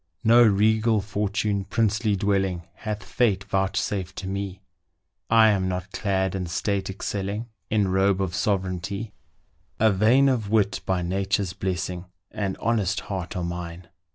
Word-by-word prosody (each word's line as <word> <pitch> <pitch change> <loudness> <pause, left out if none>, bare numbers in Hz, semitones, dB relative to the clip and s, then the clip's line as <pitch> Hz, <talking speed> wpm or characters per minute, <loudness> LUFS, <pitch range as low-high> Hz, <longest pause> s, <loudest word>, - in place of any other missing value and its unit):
No 115 +2 +6
regal 110 +1 +3
fortune, 105 0 -1
princely 110 0 +1
dwelling, 95 -3 0
Hath 105 0 -5
fate 100 -6 +1
vouchsafed 95 -1 -1
to 95 - -5
me, 95 0 -4 0.7
I 110 -1 +6
am 95 -3 +1
not 95 +1 -4
clad, 95 -2 0
in 95 -2 -3
state 100 +4 -1
excelling, 100 +3 -4 0.2
In 105 -2 +2
robe 95 +1 +2
of 95 -3 -1
sovereignty: 100 +2 -2 0.7
A 110 0 +5
vein 115 +8 +4
of 120 -6 0
wit, 100 -3 +2
by 95 -2 +1
nature's 95 +1 0
blessing, 90 -1 -3 0.3
And 100 -3 -3
honest 105 -4 0
heart 95 -3 -5
are 90 - -2
mine. 85 0 -6
100 Hz, 140 wpm, -25 LUFS, 95-105 Hz, 0.7 s, No